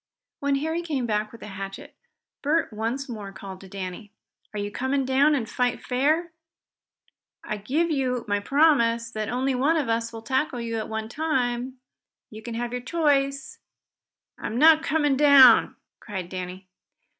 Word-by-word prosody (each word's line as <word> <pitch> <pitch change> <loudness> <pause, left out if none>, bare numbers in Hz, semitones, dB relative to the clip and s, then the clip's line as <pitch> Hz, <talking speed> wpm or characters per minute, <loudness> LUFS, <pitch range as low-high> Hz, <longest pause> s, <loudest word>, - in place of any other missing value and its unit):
When 285 -1 +1
Harry 320 +4 -1
came 295 -7 -2
back 215 -1 -1
with 230 - -13
the - - -8
hatchet 195 0 -8 0.5
Bert 305 -3 0
once 230 +6 -3
more 210 -5 -7
called 190 -1 -10
to 195 - -12
Danny. 195 +2 -7 0.4
"Are 210 - -7
you 205 0 -3
coming 265 +4 -1
down 275 +3 +3
and 240 -5 -2
fight 245 +1 -1
fair? 305 +7 +1 1.1
I 215 - -4
give 295 +11 0
you 255 -4 -1
my 205 0 +1
promise 235 -3 +2
that 215 -1 -4
only 260 +3 0
one 285 +6 +2
of 285 -7 -1
us 230 0 -1
will 225 -1 -9
tackle 260 0 -1
you 230 -1 -3
at 220 - -5
a 220 0 -3
time. 255 -3 -2 0.5
You 215 0 -9
can 235 0 -6
have 240 0 -3
your 250 0 -3
choice." 275 -2 0 0.8
"I'm 225 - -4
not 315 +3 +7
coming 295 -3 +1
down!" 275 -5 +7 0.2
cried 190 -4 -6
Danny. 185 0 -7
250 Hz, 165 wpm, -25 LUFS, 215-280 Hz, 1.1 s, not